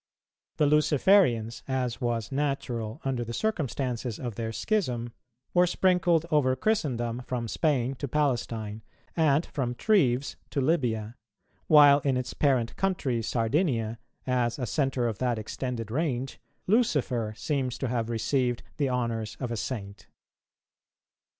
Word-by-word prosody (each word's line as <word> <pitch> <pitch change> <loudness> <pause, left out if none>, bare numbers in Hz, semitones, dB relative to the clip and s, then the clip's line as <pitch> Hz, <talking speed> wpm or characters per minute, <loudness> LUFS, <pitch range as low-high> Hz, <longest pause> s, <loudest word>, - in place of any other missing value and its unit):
The 150 - +3
Luciferians, 145 - +3
as 130 -3 -2
was 115 -3 -1
natural 135 -4 -2
under 130 -3 -1
the 115 0 -5
circumstances 130 - -2
of 120 -3 -5
their 110 +2 -4
schism, 120 - -1 0.4
were 180 0 +5
sprinkled 175 -3 +2
over 135 -4 +3
Christendom 125 - -1
from 120 -2 -2
Spain 135 -2 +1
to 140 - -4
Palestine, 120 -6 -1 0.3
and 155 -1 +3
from 125 -3 -3
Treves 140 - +2
to - - -2
Lybia; 120 -6 0 0.5
while 145 -2 +8
in 135 -2 0
its 125 -1 -3
parent 130 -5 +1
country 150 -11 0
Sardinia, 115 - 0 0.3
as 125 -2 0
a 130 - -2
centre 135 -3 0
of 110 -4 -4
that 125 -2 0
extended 115 0 -4
range, 135 -2 -2 0.3
Lucifer 155 - +1
seems 130 -3 -1
to 135 - -2
have 115 -1 -1
received 120 +1 0
the 140 -3 +1
honours 115 -4 -2
of 125 -3 -3
a - - -1
Saint. 100 -3 -5
125 Hz, 130 wpm, -28 LUFS, 115-145 Hz, 0.5 s, while